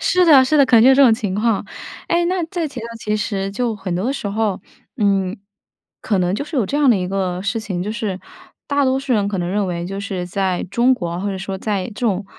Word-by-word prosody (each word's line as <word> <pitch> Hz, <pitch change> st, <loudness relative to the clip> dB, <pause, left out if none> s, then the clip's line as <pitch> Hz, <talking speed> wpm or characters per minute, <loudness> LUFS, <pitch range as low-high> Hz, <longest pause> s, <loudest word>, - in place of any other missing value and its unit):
是 365 Hz, -1 st, +3 dB
的， 285 Hz, -6 st, +7 dB
是 305 Hz, +4 st, +2 dB
的， 280 Hz, -, +6 dB
可 250 Hz, -, +4 dB
能 220 Hz, -, +7 dB
就 265 Hz, +2 st, +7 dB
这 280 Hz, -, +5 dB
种 245 Hz, -4 st, +7 dB
情 205 Hz, -4 st, -2 dB
况。 215 Hz, 0 st, 0 dB, 0.4 s
哎， 345 Hz, 0 st, +2 dB
那 365 Hz, 0 st, 0 dB
再 335 Hz, 0 st, -3 dB
提 275 Hz, -4 st, -7 dB
到 230 Hz, -, -6 dB
其 215 Hz, -1 st, -1 dB
实 200 Hz, -3 st, -2 dB
就 230 Hz, +2 st, -2 dB
很 190 Hz, -3 st, -4 dB
多 180 Hz, +3 st, -2 dB
的 265 Hz, -, 0 dB
时 275 Hz, -, -5 dB
候， 210 Hz, -1 st, -1 dB, 0.4 s
嗯， 195 Hz, -4 st, +1 dB, 0.6 s
可 205 Hz, -3 st, 0 dB
能 180 Hz, 0 st, +1 dB
就 280 Hz, -, -3 dB
是 300 Hz, +1 st, -6 dB
有 245 Hz, -, +2 dB
这 280 Hz, -, -2 dB
样 290 Hz, -2 st, +3 dB
的 235 Hz, -, +5 dB
一 180 Hz, -1 st, -2 dB
个 185 Hz, -1 st, -2 dB
事 200 Hz, +4 st, -1 dB
情， 190 Hz, -5 st, -4 dB
就 210 Hz, +3 st, -3 dB
是 210 Hz, -4 st, -3 dB, 0.5 s
大 285 Hz, -1 st, +1 dB
多 260 Hz, 0 st, +2 dB
数 270 Hz, -1 st, -2 dB
人 205 Hz, -3 st, +1 dB
可 200 Hz, -2 st, -3 dB
能 175 Hz, -1 st, -2 dB
认 200 Hz, +2 st, 0 dB
为 170 Hz, -1 st, -3 dB
就 195 Hz, +2 st, -5 dB
是 190 Hz, -3 st, -4 dB
在 185 Hz, 0 st, -1 dB
中 240 Hz, +5 st, +3 dB
国， 175 Hz, -6 st, -4 dB
或 205 Hz, -, -2 dB
者 195 Hz, -, -3 dB
说 190 Hz, 0 st, -5 dB
在 200 Hz, -2 st, -2 dB
这 220 Hz, -, -10 dB
种 200 Hz, -2 st, 0 dB
210 Hz, 280 characters per minute, -19 LUFS, 190-255 Hz, 0.6 s, 的